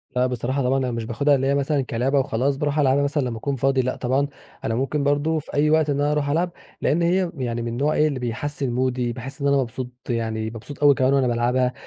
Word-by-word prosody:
لأ، 125 0 +3
بصراحة 130 +2 -2
طبعًا 130 +2 +2
أنا 130 -2 -1
مش 115 -1 -3
باخدها 140 +5 +2
اللي 135 0 0
هي 140 - +2
مثلًا 140 0 +1
كلِعبة 130 +3 0
وخلاص، 135 +1 0
باروح 150 +1 0
ألعبها 140 0 +3
مثلًا 145 +1 0
لمّا 120 -3 -3
أكون 140 +4 -2
فاضي 135 +1 +2
لأ، 130 0 -2
طبعًا 135 +3 0 0.4
أنا 115 - -1
ممكن 135 +4 -1
برضه 145 +3 +1
في 150 - -12
أي 150 +1 +3
وقت 155 -1 +3
إن 145 0 0
أنا 145 +1 +2
أروح 145 -1 0
ألعب. 170 +4 +1 0.3
لأن 165 - +2
هي 175 +1 +2
يعني 120 -2 -2
من 120 - -3
النوع 140 +6 0
إيه 155 - +3
اللي 140 -4 -2
بيحسِّن 130 +3 -2
مودي 125 -1 0
باحس 135 +4 -6
إن 140 - +1
أنا 140 0 +4
مبسوط 130 -1 -3 0.2
يعني 110 -2 -1
مبسوط 115 +6 -8
أوي 145 -1 +8
كمان 130 +1 +2
وأنا 135 -2 +3
بالعبها. 125 +1 +1
135 Hz, 245 wpm, -23 LUFS, 125-145 Hz, 0.4 s, أوي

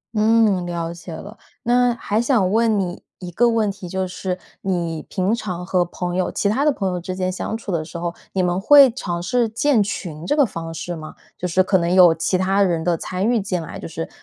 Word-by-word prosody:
嗯， 215 -4 +3
了 170 -1 -3
解 170 0 -9
了。 205 +7 -9 0.3
那 245 0 +3
还 220 -1 -1
想 235 -7 +2
问 225 0 +3
你 175 -1 -4 0.2
一 180 -1 -7
个 240 +7 +3
问 220 -3 +1
题， 195 -2 -9
就 190 +1 -2
是 180 0 -4 0.2
你 170 -4 -2
平 190 +2 0
常 185 -6 -4
和 180 -1 +1
朋 175 0 -4
友 185 - 0
其 200 - 0
他 265 +8 +1
的 300 - +5
朋 195 -6 -2
友 180 - -2
之 185 +1 -5
间 185 0 -1
相 190 - -4
处 225 -3 -6
的 160 -3 -1
时 170 - -8
候， 170 0 -3 0.2
你 190 - +1
们 180 0 0
会 275 +5 +7
尝 175 -7 -4
试 245 +4 +1
建 235 +1 +2
群 170 -5 -4
这 240 - +1
个 290 -2 +5
方 165 -6 -6
式 175 +1 -5
吗？ 155 -1 -9 0.2
就 180 - -3
是 185 +2 +3
可 190 +1 +2
能 170 0 0
有 180 -3 +7
其 185 +3 0
他 195 +2 +1
人 170 -4 +1
的 170 0 +1
参 185 +4 -3
与 240 -1 +2
进 190 -3 -2
来， 160 - -8
就 - - -7
是， 165 0 -6
185 Hz, 255 characters per minute, -21 LUFS, 175-220 Hz, 0.3 s, 会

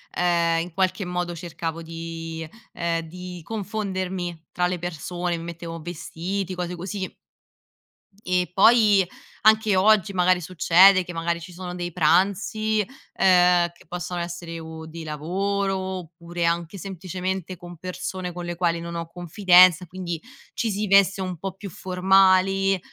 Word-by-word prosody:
ehm, 170 -1 +2
in 175 -1 -7
qualche 190 +1 0
modo 180 -1 -3
cercavo 165 0 -5
di, 165 0 -6 0.3
ehm 170 -1 -1
di 180 +1 -8
confondermi 185 -5 -4
tra 180 0 +1
le 180 0 -2
persone, 175 +1 -3
mi 165 - -7
mettevo 170 0 -7
vestiti, 180 +3 -4
cose 180 0 -4
così. 190 +2 -5 1.1
E 180 0 0
poi 205 -3 +5 0.4
anche 220 -1 +5
oggi 200 0 +4
magari 180 0 +3
succede 185 +2 +5
che 175 - -8
magari 170 0 -2
ci 180 - -10
sono 180 0 -7
dei 175 -1 -4
pranzi, 200 +6 +2 0.3
ehm, 180 -2 +4
che - - -21
possono 175 0 -4
essere 170 -1 -5
o 160 0 -8
di 165 +1 -8
lavoro 195 +6 -1
oppure 175 -2 -4
anche 170 +2 -1
semplicemente 185 0 -4
con 175 -1 -11
persone 185 +1 -5
con 175 0 -6
le 175 0 -4
quali 170 -1 0
non 170 0 -6
ho 165 -1 -4
confidenza, 180 0 +5
quindi 175 -2 -5 0.3
ci 230 - -1
si 210 +2 -1
veste 195 0 +4
un 185 -2 -4
po' 195 0 -4
più 195 -1 -9
formali, 190 +1 +3
180 Hz, 145 wpm, -24 LUFS, 170-190 Hz, 1.1 s, poi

